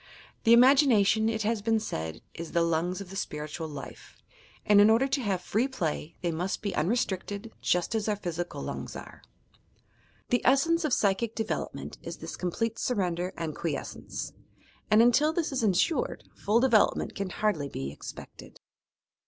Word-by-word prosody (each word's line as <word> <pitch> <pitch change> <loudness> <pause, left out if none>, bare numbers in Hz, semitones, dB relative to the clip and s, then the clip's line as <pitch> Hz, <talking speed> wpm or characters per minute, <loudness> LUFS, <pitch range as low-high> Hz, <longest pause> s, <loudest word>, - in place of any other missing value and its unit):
"The 230 +1 +8
imagi 270 +4 +7
nation" 220 -1 +3
it 220 -1 -1
has 220 0 0
been 225 +1 +2
said 80 - -5
"is 165 -1 -7
the 170 - +3
lungs 170 +3 0
of 190 -2 -9
the - - -8
spiritual 155 -3 -4
life," 145 -3 -10 0.5
and 205 -1 +6
in 205 - +7
order 230 +5 +4
to 275 0 0
have 195 -6 -1
free 225 +8 +1
play, 165 - -3
they 170 - +1
must 180 +6 -3
be 200 - -2
unrestricted, 200 +3 -1
just 180 +3 +1
as 220 -1 0
our 210 - +1
physical 175 -3 -4
lungs - - -5
are. - - -10 1.1
The 245 - +2
essence 330 +6 +3
of 305 - 0
psychie 210 +3 +1
development 220 - -4
is - - -7
this - - -7
complete 225 +6 -2
surrender 180 -6 -1
and 160 -3 -4
quiescence, 150 -5 -5 0.6
and 215 +2 +6
until 290 +6 +4
this 330 -3 -1
is 265 -2 -1
insured, 215 - +1
full 215 +3 +2
development 235 -4 +3
can 195 -2 -3
hardly 175 -8 -1
be 70 - -5
expected. 75 - -11
205 Hz, 165 wpm, -28 LUFS, 175-230 Hz, 1.1 s, The